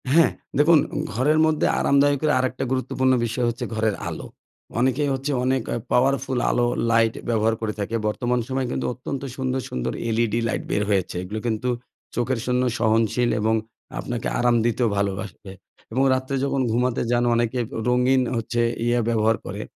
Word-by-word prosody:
হ্যাঁ, 165 +3 +5 0.3
দেখুন, 160 +3 +6 0.4
ঘরের 145 +8 +2
মধ্যে 155 -1 +1
আরামদায়ক 140 0 +3
এর 150 - +3
আরেকটা 130 0 -1
গুরুত্বপূর্ণ 130 0 +1
বিষয় 120 +2 -1
হচ্ছে 120 - -4
ঘরের 110 -2 +1
আলো। - - -7 0.5
অনেকেই 130 +3 +2
হচ্ছে 135 +2 -2
অনেক 130 0 +1
আ - - -1 0.2
পাওয়ারফুল 130 0 +2
আলো 120 0 +2 0.2
লাইট 115 -1 +3 0.2
ব্যবহার 110 -1 +2
করে 110 -1 -2
থাকে 105 +3 -2
বর্তমান 120 +3 0
সময়ে 130 -1 -1
কিন্তু - - -2
অত্যন্ত 130 +2 -5
সুন্দর, 130 -1 -1
সুন্দর 60 - -3 0.2
LED 115 -2 +1
লাইট 115 - -2
বের 105 - +1
হয়েছে 95 -3 0
এগুলো 105 +4 -5
কিন্তু 115 +2 -1 0.5
চোখের 120 0 0
জন্য 125 0 +1 0.2
সহনশীল 115 +1 +2
এবং 110 +1 +2 0.4
আপনাকে 120 -1 -3
আরাম 120 0 +3
দিতেও 120 +1 +1
ভালোবাসে 100 -1 -3 0.4
এবং 130 +4 +1
রাত্রে 130 +1 -2
যখন 140 -1 0
ঘুমাতে 125 +1 +1
যান 120 0 +2
অনেকে 120 +1 0
অ্যা - - -6
রঙিন 125 +1 +3
হচ্ছে 120 +1 -1 0.2
ইয়ে 120 0 +2
ব্যবহার 110 -1 +2
করে - - -5
120 Hz, 165 wpm, -23 LUFS, 115-130 Hz, 0.5 s, দেখুন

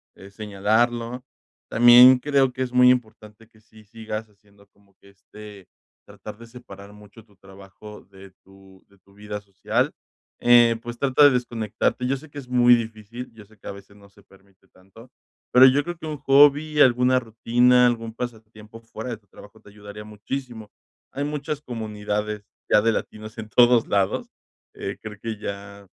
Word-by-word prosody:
eh, 100 +1 -15
señalarlo. 115 +4 -1 0.5
También 120 +2 +7
creo 135 -1 +1
que 130 - -7
es 125 - -6
muy 125 0 +6
importante 110 -3 -3
que 110 -1 -26
sí 110 0 -20
sigas 110 0 -7
haciendo 100 0 -26
como 100 0 -32
que, 100 - -20
este, 100 0 -15 0.4
tratar - - -11
de 115 - -13
separar 100 -5 -13
mucho 105 +1 -17
tu 105 -3 -27
trabajo 100 +2 -14
de 95 -1 -15
tu 95 -1 -20
de 100 - -25
tu 100 +2 -26
vida 105 0 -8
social, 100 -1 -2 0.5
eh, 120 -1 +5
pues 120 0 -8
trata 140 +1 +2
de - - +8
desconectarte. 120 -1 -2
Yo 135 +2 -1
sé 155 +3 -15
que 145 - -14
es 130 - -12
muy 125 -1 +5
difícil. 115 +1 -7
Yo 110 -2 -15
sé 110 +1 -24
que - - -14
a - - -4
veces 100 +1 -16
no 100 -1 -19
se 100 - -23
permite 95 0 -26
tanto, 95 +6 -19 0.4
pero 125 +1 +7
yo 140 +3 +2
creo 175 0 -6
que 160 - -10
un 155 -1 -5
hobby, 145 +2 +3
alguna 125 0 +4
rutina, 125 +2 +2
algún 115 -2 -3
pasatiempo 110 -2 -9
fuera 115 +1 -9
de 115 - -5
tu 105 -1 -35
trabajo 105 +2 -17
te - - -18
ayudaría 105 0 -12
muchísimo. 110 +1 -8 0.4
Hay 140 - -4
muchas 150 0 -5
comunidades 105 -3 -5 0.3
ya 105 - +5
de 115 +2 +2
latinos 110 +1 -7
en 110 - -7
todos 120 -1 +4
lados. 100 -1 -1 0.5
Eh, 100 +1 -6
creo 105 -1 -9
que 115 -2 -5
ya 100 -1 -8
110 Hz, 180 wpm, -23 LUFS, 100-125 Hz, 0.5 s, de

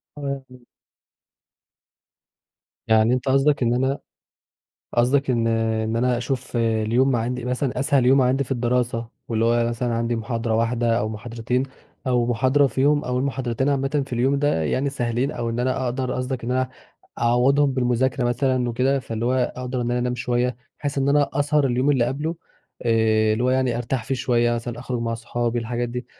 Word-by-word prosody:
تمام. 140 -2 -4
امم. 125 -1 -16 2.2
يعني 110 +1 +4
أنت 130 +1 -1
قصدك 135 +1 +3
إن 120 0 +2
أنا 130 +3 0 1.0
قصدك 130 +3 +2
إن 115 -2 +1
إن 110 0 0
أنا 125 +1 +2
أشوف 130 0 -3
اليوم 115 +3 +2
ما 125 - +2
عندي 125 +2 -3
مثلًا 125 +1 -1
أسهل 135 -2 +2
يوم 135 +1 +5
عندي 130 +2 +2
في 135 - -4
الدراسة، 120 -1 0 0.2
واللي 115 -1 0
هو 115 0 +2
مثلًا 120 0 -2
عندي 115 +1 -1
محاضرة 115 0 -2
واحدة 115 0 +1
أو 110 - -1
محاضرتين 115 +3 -2 0.4
أو 125 -2 +2
محاضرة 130 +4 +3
فيهم 145 +3 +2
أول 125 0 -1
محاضرتين 130 -1 -1
عامةً 140 +1 +1
في 135 - -14
اليوم 130 +4 +2
ده 145 - +1
يعني 130 - 0
سهلين 120 0 -1
أو 115 -1 -3
إن 115 +1 -2
أنا 130 +1 0
أقدر 130 +1 -2
قصدك 125 -1 -3
إن 120 - -3
أنا 130 0 0 0.5
أعوضهم 135 +4 +3
بالمذاكرة 125 0 +1
مثلًا 125 0 +1
وكده، 130 +4 +1
فاللي 115 -3 -4
هو 125 0 +1
أقدر 125 0 -3
إن 120 0 -1
أنا 120 - 0
أنام 125 0 -1
شوية 125 0 -1 0.2
بحيث 145 -1 -3
إن 135 0 +1
أنا 145 -1 +3
أسهر 145 0 +2
اليوم 130 +3 +1
اللي 130 -4 +3
قبله 150 +7 -2 0.5
آآ 110 -2 +3
اللي 115 +3 0
هو 125 - +3
يعني 130 -2 +1
أرتاح 120 0 -2
فيه 135 - -1
شوية 120 -2 +1
مثلًا، 120 0 -5
أخرج 125 -1 -3
مع 115 0 -1
أصحابي، 120 +1 -2
الحاجات 120 +1 -2
دي 125 0 -5
125 Hz, 180 wpm, -23 LUFS, 120-130 Hz, 2.2 s, يوم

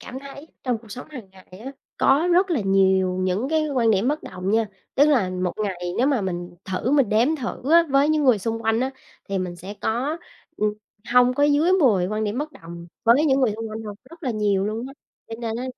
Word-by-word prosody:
cảm 255 - -8
thấy 280 +2 -11 0.2
trong 245 -4 -1
cuộc 225 -1 -18
sống 250 +5 -8
hàng 240 -10 -10
ngày 190 -1 -18 0.2
á, 270 - -5 0.3
có 300 +6 +3
rất 370 +2 +3
là 310 -8 +1
nhiều 190 -2 +2
những 185 +8 -1
cái 315 -1 +1
quan 245 -5 +2
điểm 215 +3 +2
bất 300 +2 -1
đồng 185 +1 -5
nha. 225 +1 +2 0.3
Tức 285 +2 +5
là 235 -11 +2
một 180 -1 -2
ngày 180 -3 -4
nếu 255 - +3
mà 275 -6 +2
mình 175 -2 -4
thử 190 +5 -2
mình 280 -5 +3
đếm 235 +10 +2
thử 260 +1 -5
á 335 0 +8
với 275 +2 +3
những 310 -2 +2
người 250 -5 +4
xung 225 +2 -3
quanh 225 +1 +1
á, 260 +1 0 0.4
thì 195 - -1
mình 180 -1 -4
sẽ 190 +4 -8
có, 265 +9 -1 0.4
ừm, 210 0 0 0.4
hông 250 0 +5
có 285 - 0
dưới 295 +5 +3
10 235 - +3
quan 215 +2 -2
điểm 210 +4 -2
bất 305 +2 -4
đồng 170 +1 -11 0.2
với 245 +7 +5
những 270 -1 +3
người 235 -5 +2
xung 225 0 -5
quanh 220 +1 -6
đâu, 210 -2 -7 0.2
rất 335 +1 -15
là 260 - -1
nhiều 205 -3 0
luôn 220 +4 -3
á. 270 - -9 0.4
Cho 225 - -5
nên 225 -1 -3
á 250 - -4
230 Hz, 245 wpm, -23 LUFS, 195-275 Hz, 0.4 s, á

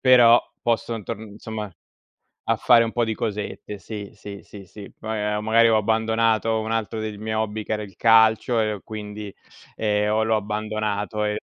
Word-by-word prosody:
però 120 -2 +7 0.2
posso 115 -1 -1
torn 110 +1 -6
insomma, 105 -1 -6 0.7
a - - +1
fare 115 -1 +5
un 115 - -4
po' 120 - 0
di 110 -1 -2
cosette. 105 -1 -4
Sì, 105 -1 -7
sì, 100 -1 -9
sì, 100 -2 -12
sì, 100 +2 -11
Poi 110 0 -4
ehm, 105 0 -1
magari 115 +1 +5
ho 110 - +4
abbandonato 110 +1 +1
un 110 - -4
altro 115 -1 -2
dei 110 -1 -5
miei 110 +1 -3
hobby 110 0 -2
che - - -4
era 105 - -1
il 100 -3 -11
calcio 115 +1 +4
e 110 -1 0
ho 100 - -9
quindi, 105 -1 -7 0.4
ehm, 105 -1 +1
ho 110 +1 +2
l'ho 110 0 +2
abbandonato, 105 0 -2
ehm, 105 0 -1
110 Hz, 190 wpm, -23 LUFS, 105-110 Hz, 0.7 s, però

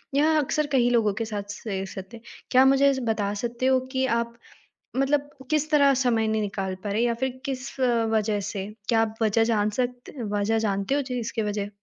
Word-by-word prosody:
यह 310 +2 +4
अक्सर 300 +1 0
कई 245 -2 +3
लोगों 225 -4 +2
के - - 0
साथ 210 -2 -4 0.2
से 195 -3 -3
सकते 190 +4 -8
हैं। 225 - -18 0.3
क्या 260 +1 +6
मुझे 275 +1 +5
ज 265 - -3
बता 205 -2 0
सकते 240 +2 -2
हो 260 0 +4
कि 260 -1 +1
आप 235 0 -3 0.6
मतलब 285 +1 +1 0.2
किस 305 0 +1
तरह 280 -2 +5
समय 240 -4 +2
नहीं 220 0 +1
निकाल 195 -2 -3
पा 205 - -3
रहे 215 +3 +1
या 240 -1 +2
फिर 260 +2 -3
किस 265 -1 -4
वज़ह 225 -4 +1
से? 195 0 -4 0.2
क्या 225 -1 +3
आप 220 0 -1
वज़ह 225 +1 +3
जान 215 -2 +1
सकते 245 0 -3
वज़ह 205 +1 0
जानते 200 +4 0
हो? 290 - +2
जी 255 -2 -3
इसकी 225 0 -3
वज़ह? 205 -1 -2
235 Hz, 210 wpm, -25 LUFS, 210-265 Hz, 0.6 s, क्या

